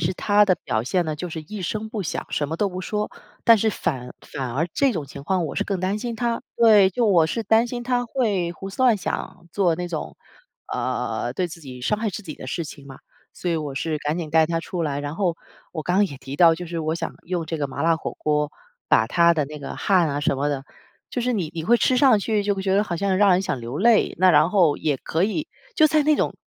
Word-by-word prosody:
是 170 +3 0
她 205 +2 +4
的 185 -3 +2
表 110 -1 0
现 175 +9 0
呢， 155 -1 -2
就 175 +4 -5
是 160 -1 -5
一 195 +6 -7
声 215 +5 -3
不 215 -3 -4
响， 165 - -4
什 145 - -1
么 160 - -3
都 205 +3 +1
不 185 -1 -6
说。 210 +2 -2 0.4
但 230 - +8
是 220 +1 +1
反 125 -10 -3 0.2
反 130 -3 -3
而 150 +7 0
这 275 -2 +3
种 155 -8 -4
情 140 +1 -10
况 185 +2 0
我 - - -6
是 - - 0
更 200 -2 -2
担 185 +3 -1
心 235 -1 -4
她 235 0 -1
对， 215 -5 +6
就 235 +5 +1
我 180 -6 +5
是 225 +7 -3
担 225 +3 +3
心 240 0 -5
她 245 0 0
会 210 -8 0
胡 190 +3 -8
思 200 +6 -3
乱 245 -4 +5
想 180 -2 -5
做 180 -5 +2
那 180 +1 -3
种， 165 -3 -5 0.6
呃， - - -2
对 185 - -1
自 170 0 -10
己 130 -4 -10
伤 170 +12 0
害 220 -2 0
自 195 - -6
己 155 -6 -7
的 130 - -9
事 170 +5 -3
情 145 -1 -10
嘛， 135 - -11 0.3
所 180 - -5
以 170 - +1
我 150 -3 -4
是 155 +2 -1
赶 150 +3 -2
紧 165 -3 -4
带 160 +1 +4
她 165 +1 -1
出 170 +1 -4
来， 145 -3 -1
然 145 +1 -4
后 175 -2 0 0.3
我 155 -3 -5
刚 180 - 0
刚 205 - +5
也 140 - -9
提 135 +1 -8
到 165 +1 +6
就 175 +1 -6
是 170 0 -4
我 160 +1 -1
想 - - -4
用 175 -2 -3
这 160 - -3
个 145 -2 -2
麻 130 - -5
辣 165 0 +3
火 - - -5
锅 150 -1 0 0.4
把 - - +5
她 170 -1 +4
的 155 -3 +1
那 150 +1 -8
个 140 - -7
汗 180 -5 +3
啊 145 0 -2
什 145 - +1
么 140 +2 0
的， 140 -2 -3 0.5
就 250 - -2
是 250 +1 0
你 175 -8 -2
你 165 - -3
会 240 +7 +5
吃 255 +2 +2
上 255 -5 +6
去 210 0 0
就 205 0 +1
会 195 - -4
觉 190 0 +1
得 200 - +4
好 175 -4 -3
像 195 +1 0
让 205 -1 +5
人 180 +1 +3
想 135 - -2
流 120 +3 -5
泪。 225 +1 +4
那 185 +1 +6
然 150 0 +5
后 175 -8 +4
也 150 -3 0
可 165 +7 0
以 260 +10 -2 0.3
就 310 - +6
在 310 0 +3
那 305 0 +4
种 - - 0
175 Hz, 290 characters per minute, -23 LUFS, 155-210 Hz, 0.6 s, 但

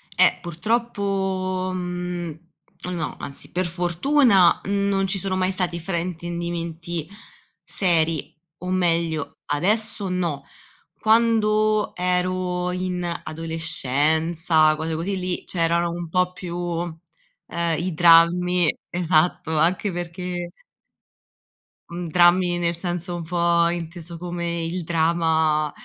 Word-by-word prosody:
Eh - - +4
purtroppo, 190 -1 -1
mhmm, 180 -2 -4 0.6
no. 160 -3 -3
Anzi 140 - -9
per 185 +1 -1
fortuna 180 - +3
non 200 0 +1
ci 195 +1 +1
sono 190 0 -1
mai 185 0 +1
stati 180 -2 -2
fraintendimenti 170 -1 -4 0.6
seri, 165 -6 +1 0.3
o 180 - -4
meglio, 165 -4 0 0.2
adesso 200 +5 +1
no, 170 -6 -2 0.6
quando 215 -1 +2
ero 180 0 -1
in 180 -1 -3 0.2
adolescenza, 160 0 +1
cose 160 +1 -3
così, 180 +5 -2
lì 180 -1 -3
c’erano 170 0 +1
un 170 -1 -5
po’ 180 +1 +1
più, 180 -1 -7 0.9
ehm, 170 -2 -1
i 175 0 -2
drammi, 170 +1 +5 0.2
esatto, 160 -2 +1
anche 180 +5 +2
perché 175 0 -5 1.4
Uhm, 170 -1 -5
drammi 175 +1 +4
nel 170 -1 -1
senso 175 0 -3
un 170 - -5
po’ 170 0 +2
inteso 170 0 -6
come 170 -1 -3
il 175 +1 -3
drama 160 -2 +1
175 Hz, 105 wpm, -23 LUFS, 165-185 Hz, 1.4 s, drammi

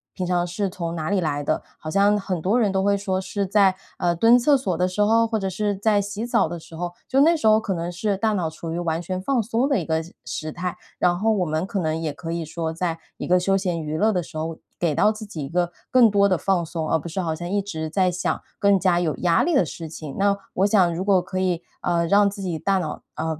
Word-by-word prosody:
平 185 -2 -3
常 175 -1 +1
是 190 +3 -2
从 170 -2 -4
哪 155 +1 -3
里 200 -2 +2
来 145 -4 -1
的？” 155 - -1 0.2
好 155 - -6
像 200 +5 +3
很 185 -3 -3
多 205 +9 +2
人 210 -4 +2
都 190 0 0
会 200 0 +3
说 190 -2 -1
是 195 +1 -3
在， 195 -1 +4 0.2
呃， 175 -1 +1
蹲 230 +7 +6
厕 280 +4 +4
所 190 -9 -2
的 180 0 +2
时 185 +3 -2
候， 225 +2 +4
或 220 -1 -1
者 195 -1 -2
是 205 +2 -1
在 205 +1 +2
洗 205 +2 -5
澡 235 - +2
的 170 +1 -6
时 165 0 -13
候， 175 +1 -4 0.2
就 270 +1 +4
那 330 +3 +5
时 225 -8 0
候 215 0 +6
可 200 -3 -2
能 170 0 -3
是 200 +3 -1
大 220 +1 +1
脑 175 -5 0
处 165 +1 -7
于 170 - -3
完 165 -1 -1
全 185 +1 -3
放 255 +3 +1
松 230 +4 0
的 275 -5 +2
一 165 - -4
个 160 0 0
时 170 - -14
时 155 0 -4
态。 180 +2 -4 0.2
然 175 -1 +3
后 220 +4 +2
我 190 -4 +1
们 155 +3 -1
可 200 0 -3
能 160 -2 -1
也 155 -3 -3
可 165 +2 -6
以 170 -1 -3
说 160 +1 -3
在 165 -1 -2 0.2
一 - - -5
个 180 +1 +4
休 195 +2 +2
闲 180 -4 -2
娱 155 0 -3
乐 220 +5 +3
的 180 - +1
时 155 - -9
候， 160 +1 -3 0.2
给 170 -3 +1
到 210 +8 +4
自 215 0 -8
己 165 -9 -6
一 - - -8
个 175 0 0 0.2
更 240 -4 +6
多 200 -1 +4
的 185 -3 +2
放 185 -3 0
松， 160 -1 -4
而 160 - +2
不 170 - -8
是 185 +3 -3
好 160 -2 -1
像 175 +2 -6
一 200 +1 +1
直 160 -5 -5
在 185 +2 +2
想 180 - -2 0.2
更 200 -1 +4
加 180 -1 +2
有 160 -3 0
压 170 -2 +3
力 340 -1 +1
的 195 - +5
事 165 +1 -7
情。 155 -2 -8
那 200 0 +3 0.2
我 190 - +3
想 190 -5 +3
如 180 +3 -3
果 195 -3 +4
可 185 - -4
以， 180 -2 0 0.2
呃， 170 -1 +1
让 200 +2 +5
自 200 0 -8
己 175 -5 -3
大 195 -1 +1
脑， 155 -4 -4
呃， 160 -1 -3
180 Hz, 300 characters per minute, -23 LUFS, 165-200 Hz, 0.2 s, 蹲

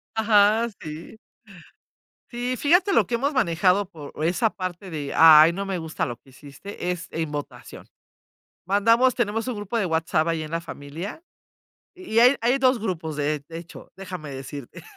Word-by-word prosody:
Ajá, 220 +1 +3
sí. 155 +7 -9 1.1
Sí, 245 +1 -3
fíjate 355 +6 +3
lo - - +3
que 245 - -4
hemos 275 +5 0
manejado 190 - +2
por 155 -6 -11
esa 200 +7 +1
parte 185 0 -6
de: 145 -4 -5
"Ay, 160 0 +8
no 200 +2 -3
me 195 -2 -3
gusta 160 -1 -3
lo 120 -3 -6
que - - -27
hiciste", 150 +7 -8
es 180 -2 -5
en 160 -2 -4
votación. 145 -1 -8 0.8
Mandamos 230 +6 +3
tenemos 225 0 -1
un 250 - -3
grupo 205 +2 -4
de 215 - 0
WhatsApp 160 -1 0
ahí 165 -1 -1
en 155 - -9
la 165 - -1
familia, 165 - -8 0.7
y 365 - -7
y - - +7
hay 250 +4 +6
hay 245 +4 +2
2 260 -2 +3
grupos 165 -8 -4
de 150 0 -1
de 165 - -8
hecho, 170 +1 -11
déjame 180 -6 -8
decirte, 135 0 -9
185 Hz, 170 wpm, -24 LUFS, 160-230 Hz, 1.1 s, Ay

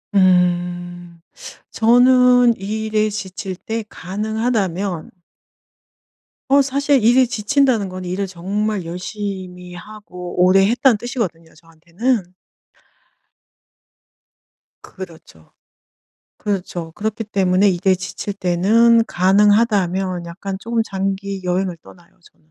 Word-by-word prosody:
음. 175 -2 +1 0.5
저는 245 +1 +5
이 215 +3 -4
일에 215 0 +1
지칠 195 -2 -6
때 225 +4 -5
가능하다면 200 -3 -3 1.4
어 280 0 +6
사실 280 -2 +1
일이 250 +2 +5
지친다는 230 -2 +1
건 185 0 -7
일을 185 +3 -2
정말 195 +2 -3
열심히 180 0 -6
하고 180 -2 -10
오래 195 +1 +5
했다는 245 0 +3
뜻이거든요 195 -9 -5
저한테는. 175 +6 -3 2.5
그렇죠. 160 - -12 0.9
그렇죠. 180 -5 -4
그렇기 220 +4 -4
때문에 195 -1 +2
이게 190 +1 +2
지칠 185 +2 -5
때는 215 +6 +3
가능하다면 195 -2 +2
약간 190 +3 -6
쪼금 230 +2 -1
장기 195 -1 -4
여행을 180 0 -1
떠나요 175 0 -19
저는. 155 - -35
195 Hz, 225 characters per minute, -19 LUFS, 180-220 Hz, 2.5 s, 어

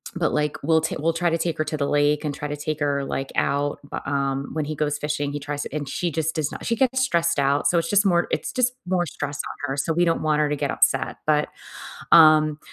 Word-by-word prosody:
but, 170 -2 0
like, 150 -1 0
we'll 160 +1 +3
t 160 - -2
we'll 165 +2 +1
try 175 +1 +1
to 165 - 0
take 165 0 -2
her 155 - +1
to 155 0 -3
the 140 -1 -1
lake 145 +1 +2
and 145 -2 -2
try 150 - -5
to 150 - -4
take 155 +1 -3
her, 140 -1 0
like, 135 0 -4
out, 145 +1 0
bu - - -6
um, 140 0 -1
when 155 -2 -2
he 155 - -4
goes 150 -1 -1
fishing, 150 -1 -2
he 145 - -4
tries 145 0 -4
to - - -8
and 145 -2 -3
she 175 +4 -2
just 160 +1 -2
does 155 -3 -1
not - - -8
she 230 - +1
gets 260 +2 +1
stressed 170 - +1
out, 140 +1 +1
so 175 - +2
it's 165 0 0
just 205 0 +3
more 175 -2 +2
it's - - -2
just 250 0 +1
more 180 -1 +1
stress 145 0 -5
on 145 - -5
her, 135 - -3
so 160 +3 0
we 175 +2 +2
don't 165 - +1
want 155 -1 +2
her 150 - +1
to 150 - 0
get - - -2
upset, - - +1
but, 150 -1 +3 0.6
um, 155 -2 +6
150 Hz, 270 wpm, -23 LUFS, 145-165 Hz, 0.6 s, um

